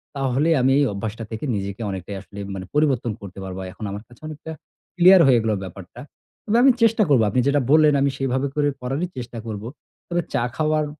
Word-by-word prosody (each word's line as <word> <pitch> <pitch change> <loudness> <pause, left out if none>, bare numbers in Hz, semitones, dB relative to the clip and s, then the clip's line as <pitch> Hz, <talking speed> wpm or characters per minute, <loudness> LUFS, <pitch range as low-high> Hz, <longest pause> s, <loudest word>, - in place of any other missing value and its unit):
তাহলে 135 +3 +1
আমি 130 +1 +3
এই 145 - +4
অভ্যাসটা 110 +3 -5
থেকে 110 +7 -5
নিজেকে 100 +2 -4
অনেকটাই 95 +1 -5
আসলে 100 +1 -15
এম - - -7
মানে 95 - -6
পরিবর্তন 135 -6 +2
করতে 100 -1 -10
পারবো। 95 0 -6
এখন 110 - -8
আমার 100 +2 -6
কাছে 120 +3 -19
অনেকটা 155 +1 -8 0.5
ক্লিয়ার 185 +1 +8
হয়ে 125 -3 +5
গেল 110 - 0
ব্যাপারটা। 95 +5 -11 0.5
তবে 225 +2 +2
আমি 270 - +7
চেষ্টা 225 -1 +4
করবো 125 -6 +5
আপনি 115 - 0
যেটা 140 0 +3
বললেন, 155 -1 +6
আমি 140 - +3
সেভাবে 135 +1 -1
করে 145 -1 +2
করারই 135 +8 -2
চেষ্টা 120 -1 -6
করবো। 105 +1 -5 0.4
তবে 175 0 0
চা 120 - +1
খাওয়ার 155 -1 +1
130 Hz, 200 wpm, -22 LUFS, 105-150 Hz, 0.5 s, ক্লিয়ার